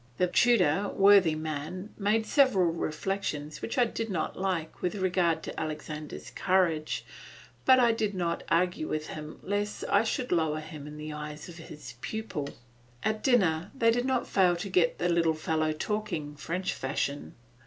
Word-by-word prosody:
The 180 Hz, -, +3 dB
tutor, 195 Hz, -3 st, +3 dB
worthy 195 Hz, -5 st, +5 dB
man, 155 Hz, +6 st, -5 dB
made 215 Hz, +2 st, +1 dB
several 210 Hz, -, +4 dB
reflections 155 Hz, -2 st, -3 dB
which 230 Hz, -, -4 dB
I 245 Hz, -, +5 dB
did 225 Hz, 0 st, -4 dB
not 180 Hz, -5 st, -2 dB
like 185 Hz, -4 st, -2 dB
with 180 Hz, +3 st, -1 dB
regard 180 Hz, -4 st, +1 dB
to -, -, -5 dB
Alexander's 155 Hz, -1 st, -6 dB
courage, 175 Hz, -5 st, +1 dB, 0.6 s
but 260 Hz, -1 st, +7 dB
I 240 Hz, -2 st, +5 dB
did 215 Hz, -3 st, -1 dB
not 170 Hz, -2 st, -1 dB
argue 170 Hz, -2 st, +1 dB
with 155 Hz, 0 st, -3 dB
him 155 Hz, 0 st, -7 dB
lest 205 Hz, +1 st, -2 dB
I 200 Hz, +2 st, +5 dB
should 245 Hz, +2 st, -2 dB
lower 160 Hz, -3 st, +1 dB
him 155 Hz, -2 st, -9 dB
in 150 Hz, 0 st, -9 dB
the 150 Hz, 0 st, -6 dB
eyes 150 Hz, +1 st, -7 dB
of 170 Hz, -, -10 dB
his 150 Hz, -6 st, -10 dB
pupil. 205 Hz, -10 st, -4 dB, 0.5 s
At 215 Hz, 0 st, 0 dB
dinner 185 Hz, -, +3 dB
they 230 Hz, -3 st, +4 dB
did 245 Hz, +2 st, 0 dB
not 260 Hz, -2 st, +1 dB
fail 180 Hz, -3 st, +3 dB
to 175 Hz, +3 st, -5 dB
get 180 Hz, -3 st, +2 dB
the 175 Hz, -, 0 dB
little 170 Hz, -2 st, +2 dB
fellow 155 Hz, 0 st, 0 dB
talking, 165 Hz, -4 st, -3 dB
French 180 Hz, +5 st, -2 dB
fashion. 140 Hz, +1 st, -3 dB
175 Hz, 165 wpm, -29 LUFS, 155-205 Hz, 0.6 s, but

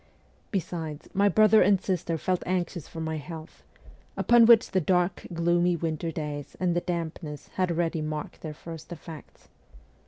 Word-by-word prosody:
Besides, 165 Hz, -5 st, -4 dB
my 200 Hz, +1 st, +4 dB
brother 215 Hz, +1 st, +6 dB
and 195 Hz, 0 st, +5 dB
sister 175 Hz, -3 st, -1 dB
felt 180 Hz, +3 st, -1 dB
anxious 175 Hz, -3 st, -2 dB
for 165 Hz, -, -9 dB
my 160 Hz, 0 st, -2 dB
health, 160 Hz, +1 st, -9 dB, 0.6 s
upon 235 Hz, -1 st, +6 dB
which 230 Hz, -2 st, +6 dB
the 185 Hz, -, +2 dB
dark, 180 Hz, +2 st, +1 dB
gloomy 175 Hz, +1 st, +2 dB
winter 165 Hz, 0 st, -2 dB
days 150 Hz, -3 st, -5 dB
and 180 Hz, -2 st, +1 dB
the 175 Hz, -, +1 dB
dampness 165 Hz, -4 st, -5 dB
had 185 Hz, -1 st, -1 dB
already 165 Hz, -1 st, 0 dB
marked 155 Hz, 0 st, -5 dB
their 155 Hz, -2 st, -6 dB
first 165 Hz, +1 st, -10 dB
effects. 165 Hz, -2 st, -11 dB
170 Hz, 155 wpm, -27 LUFS, 160-185 Hz, 0.6 s, brother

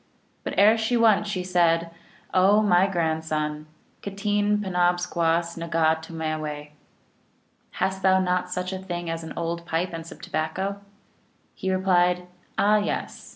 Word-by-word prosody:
But -, -, -4 dB
ere 215 Hz, +3 st, +6 dB
she 220 Hz, +2 st, +1 dB
went 215 Hz, -3 st, +4 dB
she 190 Hz, -3 st, -2 dB
said, 170 Hz, -2 st, +2 dB, 0.2 s
" -, -, -27 dB
Oh, 200 Hz, +3 st, +5 dB
my 185 Hz, -2 st, +4 dB
grandson," 160 Hz, -3 st, -2 dB, 0.2 s
" -, -, -38 dB
K -, -, -5 dB
teen 205 Hz, +1 st, +1 dB
2^nabskioass 175 Hz, -3 st, 0 dB
rfaga 160 Hz, 0 st, +2 dB
tomaice?" 155 Hz, -2 st, -4 dB
(P.). -, -, -29 dB, 1.0 s
"Hast 190 Hz, 0 st, -1 dB
thou 190 Hz, 0 st, +4 dB
not 180 Hz, -1 st, 0 dB
such 180 Hz, +1 st, -3 dB
a 190 Hz, -, -4 dB
thing 175 Hz, -3 st, -4 dB
as 165 Hz, 0 st, -4 dB
an 160 Hz, -, -7 dB
old 170 Hz, 0 st, -3 dB
pipe 170 Hz, +2 st, -1 dB
and 165 Hz, 0 st, -5 dB
some -, -, -10 dB
tobacco?" 190 Hz, +6 st, -3 dB, 0.7 s
He 190 Hz, -, -3 dB
replied, 180 Hz, -1 st, +2 dB, 0.2 s
" -, -, -35 dB
Ah 210 Hz, +1 st, +4 dB
yes. 205 Hz, -, -3 dB
180 Hz, 155 wpm, -25 LUFS, 165-195 Hz, 1.0 s, ere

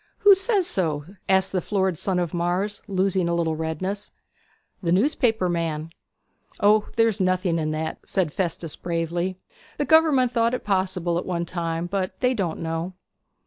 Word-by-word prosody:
'Who 410 Hz, -2 st, +9 dB
says 385 Hz, 0 st, +2 dB
so?' 160 Hz, -, -1 dB, 0.2 s
asked 190 Hz, 0 st, +3 dB
the 185 Hz, -, 0 dB
florid 190 Hz, -1 st, 0 dB
son 185 Hz, +3 st, -1 dB
of 175 Hz, -3 st, -1 dB
Mars, 180 Hz, +4 st, -1 dB
losing 190 Hz, -2 st, +1 dB
a 170 Hz, -, +1 dB
little 165 Hz, -2 st, 0 dB
redness. 185 Hz, +6 st, -3 dB, 0.7 s
'The 170 Hz, -3 st, 0 dB
newspaper 220 Hz, -, +2 dB
man.' 165 Hz, -2 st, -2 dB, 0.7 s
'O, 210 Hz, +1 st, +4 dB
there's 225 Hz, -3 st, +2 dB
nothing 185 Hz, -2 st, +1 dB
in 155 Hz, -1 st, -1 dB
that,' 155 Hz, +1 st, -3 dB
said 180 Hz, -7 st, -1 dB
Festus 170 Hz, -3 st, -2 dB
bravely. 170 Hz, +2 st, -2 dB, 0.4 s
'The 290 Hz, -, 0 dB
gover'ment 300 Hz, -6 st, +5 dB
thought 235 Hz, 0 st, +2 dB
it -, -, -6 dB
possible 185 Hz, -3 st, 0 dB
at -, -, -6 dB
one 170 Hz, -2 st, -1 dB
time; 165 Hz, -1 st, -3 dB
but 185 Hz, +1 st, -3 dB
they 250 Hz, 0 st, +2 dB
don't 185 Hz, -9 st, -2 dB
know.' 165 Hz, +2 st, -3 dB
185 Hz, 160 wpm, -24 LUFS, 170-205 Hz, 0.7 s, Who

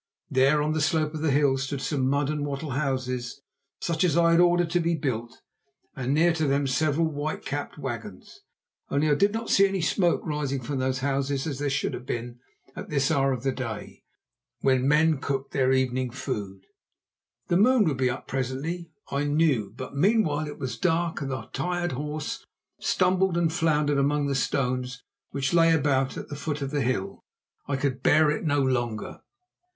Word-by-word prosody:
There 135 Hz, +3 st, +4 dB
on 155 Hz, +1 st, 0 dB
the 155 Hz, -, 0 dB
slope 155 Hz, 0 st, +1 dB
of 155 Hz, -, -5 dB
the 160 Hz, -, +1 dB
hill 140 Hz, -1 st, +3 dB
stood 135 Hz, +1 st, -3 dB
some 135 Hz, -1 st, 0 dB
mud 140 Hz, +1 st, +1 dB
and 150 Hz, -1 st, -2 dB
wattle 145 Hz, +1 st, -4 dB
houses, 130 Hz, -1 st, -2 dB, 0.4 s
such 165 Hz, 0 st, 0 dB
as 170 Hz, -3 st, +2 dB
I 170 Hz, 0 st, +5 dB
had 165 Hz, -, +5 dB
ordered 175 Hz, -1 st, +3 dB
to 175 Hz, -, +2 dB
be 170 Hz, 0 st, +1 dB
built, 120 Hz, -6 st, -4 dB, 0.5 s
and 130 Hz, 0 st, -2 dB
near 165 Hz, +4 st, +4 dB
to 160 Hz, -2 st, 0 dB
them 140 Hz, +1 st, +1 dB
several 150 Hz, +4 st, +1 dB
white 155 Hz, 0 st, -3 dB
capped 145 Hz, +2 st, -4 dB
wagons. 115 Hz, -9 st, -7 dB, 0.5 s
Only 150 Hz, +2 st, +2 dB
I -, -, +6 dB
did 200 Hz, +8 st, +3 dB
not 225 Hz, +1 st, -3 dB
see 195 Hz, 0 st, +6 dB
any 195 Hz, 0 st, -2 dB
smoke 175 Hz, +1 st, +1 dB
rising 150 Hz, -4 st, -2 dB
from 135 Hz, +3 st, -3 dB
those 130 Hz, 0 st, -1 dB
houses 140 Hz, 0 st, -1 dB
as 145 Hz, -4 st, -4 dB
there 145 Hz, 0 st, 0 dB
should 135 Hz, -, -1 dB
have 125 Hz, -, -7 dB
been 120 Hz, +1 st, -4 dB, 0.4 s
at -, -, -7 dB
this 140 Hz, -2 st, +1 dB
hour 135 Hz, -1 st, +2 dB
of 130 Hz, -2 st, -3 dB
the 135 Hz, -, +1 dB
day, 115 Hz, -5 st, -6 dB, 0.6 s
when 130 Hz, -1 st, +2 dB
men 155 Hz, 0 st, +4 dB
cooked 135 Hz, 0 st, -3 dB
their 130 Hz, -2 st, +2 dB
evening 130 Hz, -1 st, +1 dB
food. 100 Hz, -7 st, -5 dB, 0.8 s
The 175 Hz, -, +3 dB
moon 240 Hz, +3 st, +5 dB
would 150 Hz, -5 st, 0 dB
be 130 Hz, -1 st, +2 dB
up 120 Hz, -, -5 dB
presently, 135 Hz, +7 st, -3 dB, 0.2 s
I 140 Hz, +1 st, 0 dB
knew, 145 Hz, -9 st, +1 dB
but 130 Hz, +1 st, -7 dB
meanwhile 155 Hz, -3 st, +2 dB
it 145 Hz, -, -7 dB
was 130 Hz, -4 st, -5 dB
dark 170 Hz, -3 st, 0 dB
and 140 Hz, -, -3 dB
the 130 Hz, -1 st, -4 dB
tired 175 Hz, -1 st, -1 dB
horse 150 Hz, +3 st, -4 dB, 0.4 s
stumbled 185 Hz, -1 st, +2 dB
and 165 Hz, -2 st, +1 dB
floundered 150 Hz, -3 st, +2 dB
among 145 Hz, +1 st, +1 dB
the 140 Hz, -, 0 dB
stones 125 Hz, -2 st, -1 dB, 0.3 s
which 135 Hz, +1 st, -2 dB
lay 165 Hz, -1 st, +5 dB
about 135 Hz, -4 st, +1 dB
at -, -, -6 dB
the 145 Hz, -, -5 dB
foot 145 Hz, 0 st, -3 dB
of 135 Hz, -, -4 dB
the 145 Hz, -2 st, 0 dB
hill. 115 Hz, -6 st, -2 dB, 0.5 s
I 140 Hz, -, 0 dB
could 135 Hz, -2 st, -1 dB
bear 150 Hz, +2 st, +4 dB
it 150 Hz, -, -2 dB
no 145 Hz, -3 st, +2 dB
longer. 120 Hz, -4 st, -2 dB
140 Hz, 190 wpm, -26 LUFS, 130-160 Hz, 0.8 s, I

